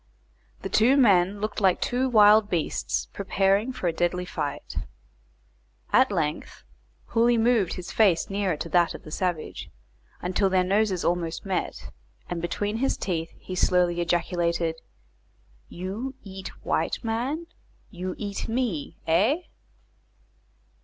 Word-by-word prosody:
The -, -, -3 dB
two 250 Hz, +6 st, +4 dB
men 200 Hz, -5 st, +4 dB
looked 215 Hz, +1 st, -3 dB
like 190 Hz, -2 st, +3 dB
two 255 Hz, +2 st, 0 dB
wild 210 Hz, -2 st, +6 dB
beasts 170 Hz, -4 st, -1 dB
preparing 195 Hz, +4 st, +1 dB
for 250 Hz, -8 st, -3 dB
a 170 Hz, -, +1 dB
deadly 175 Hz, +2 st, 0 dB
fight. -, -, -5 dB, 1.2 s
At 260 Hz, -3 st, +5 dB
length, 155 Hz, -5 st, -3 dB, 0.5 s
Hooley 235 Hz, +1 st, +3 dB
moved 225 Hz, -5 st, +2 dB
his 180 Hz, -, -7 dB
face 195 Hz, -7 st, +3 dB
nearer 195 Hz, -4 st, -1 dB
to 170 Hz, -, -5 dB
that 170 Hz, +1 st, +3 dB
of -, -, -10 dB
the 155 Hz, -, -11 dB
savage, 175 Hz, -2 st, -3 dB, 0.5 s
until 190 Hz, +2 st, +1 dB
their 185 Hz, -1 st, +3 dB
noses 195 Hz, -1 st, +1 dB
almost 170 Hz, 0 st, -1 dB
met, 190 Hz, -2 st, -3 dB, 0.4 s
and 170 Hz, -1 st, -2 dB
between 205 Hz, +5 st, -2 dB
his 270 Hz, +3 st, 0 dB
teeth 165 Hz, -3 st, -2 dB
he 185 Hz, -, -8 dB
slowly 180 Hz, -1 st, +2 dB
ejaculated: 170 Hz, -1 st, 0 dB, 0.9 s
"You 205 Hz, +9 st, -5 dB
eat 190 Hz, -1 st, -8 dB, 0.2 s
white -, -, -1 dB
man? 250 Hz, +9 st, -2 dB, 0.5 s
You 185 Hz, -1 st, -5 dB
eat 200 Hz, -2 st, -4 dB
me? 225 Hz, -, -2 dB
Eh?" 210 Hz, -, +3 dB
190 Hz, 130 wpm, -26 LUFS, 175-220 Hz, 1.2 s, wild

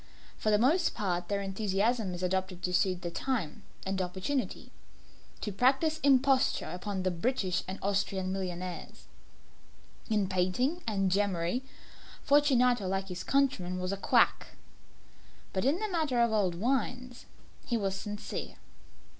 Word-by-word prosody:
For 215 Hz, -, -1 dB
the 210 Hz, -, +5 dB
most 305 Hz, -, +3 dB
part 180 Hz, -4 st, -1 dB
their 200 Hz, -1 st, -1 dB
enthusiasm 200 Hz, +1 st, 0 dB
is 175 Hz, -, -6 dB
adopted 185 Hz, 0 st, -1 dB
to 180 Hz, -, -1 dB
suit 185 Hz, 0 st, +1 dB
the 175 Hz, -, -3 dB
time 220 Hz, -, -2 dB, 0.2 s
and 190 Hz, 0 st, -1 dB
opportunity 190 Hz, +9 st, -3 dB, 0.7 s
to 210 Hz, -, -3 dB
practise 270 Hz, -, +2 dB
imposture 270 Hz, -2 st, +3 dB
upon 190 Hz, +1 st, -4 dB
the 185 Hz, -, +1 dB
British 185 Hz, -1 st, 0 dB
and 190 Hz, +1 st, -4 dB
Austrian 195 Hz, -1 st, 0 dB
millionaires. 180 Hz, -2 st, -5 dB, 1.0 s
In 210 Hz, -3 st, +2 dB
painting 190 Hz, -, 0 dB
and 195 Hz, -3 st, +1 dB
gemmary, 190 Hz, +2 st, +1 dB, 0.6 s
Fortunato, 250 Hz, -7 st, +4 dB
like 195 Hz, +1 st, -2 dB
his 180 Hz, 0 st, -5 dB
countrymen, 255 Hz, -11 st, +1 dB
was 185 Hz, +1 st, -2 dB
a -, -, 0 dB
quack -, -, +2 dB, 1.0 s
but 190 Hz, +4 st, 0 dB
in 285 Hz, +5 st, +3 dB
the 430 Hz, +3 st, -2 dB
matter 315 Hz, -, 0 dB
of 235 Hz, -1 st, +4 dB
old 195 Hz, -5 st, +1 dB
wines 250 Hz, +3 st, -2 dB, 0.4 s
he 235 Hz, -, -1 dB
was 195 Hz, -3 st, -1 dB
sincere. 205 Hz, +1 st, -5 dB
200 Hz, 140 wpm, -30 LUFS, 185-250 Hz, 1.0 s, the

